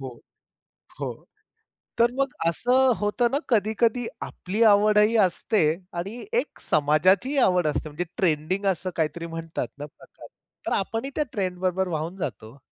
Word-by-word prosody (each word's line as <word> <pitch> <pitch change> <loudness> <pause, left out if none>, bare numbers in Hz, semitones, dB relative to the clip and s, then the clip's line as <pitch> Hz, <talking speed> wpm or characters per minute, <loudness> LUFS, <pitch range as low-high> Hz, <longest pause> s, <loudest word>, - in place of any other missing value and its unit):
हो. 130 -3 -8 0.8
हो. - - -2 0.9
तर 235 +1 +5
मग 275 -1 0
असं 250 +9 +3
होतं 210 +4 0
ना 275 - +1
कधी-कधी 225 +1 +2 0.2
आपली 200 +5 -4
आवडही 210 +2 +4
असते 195 +3 +1 0.4
आणि 200 +8 -5
एक - - -6
समाजाचीही 180 - +3
आवड 180 -3 +2
असते 150 +1 -2
म्हणजे 150 +4 -3
ट्रेंडिंग 180 +3 0
असं 185 +1 -6
काहीतरी 165 +1 -2
म्हणतात 165 0 -4
ना 145 - -6
प्रकार. 150 - -15 0.4
तर - - -1
आपणही 225 +7 -3
त्या 305 - +1
ट्रेंड 185 -3 -2
बरोबर 185 +1 0
वाहून 165 +2 -3
जातो 125 - -5
हो. 135 - -17
190 Hz, 145 wpm, -25 LUFS, 165-225 Hz, 0.9 s, तर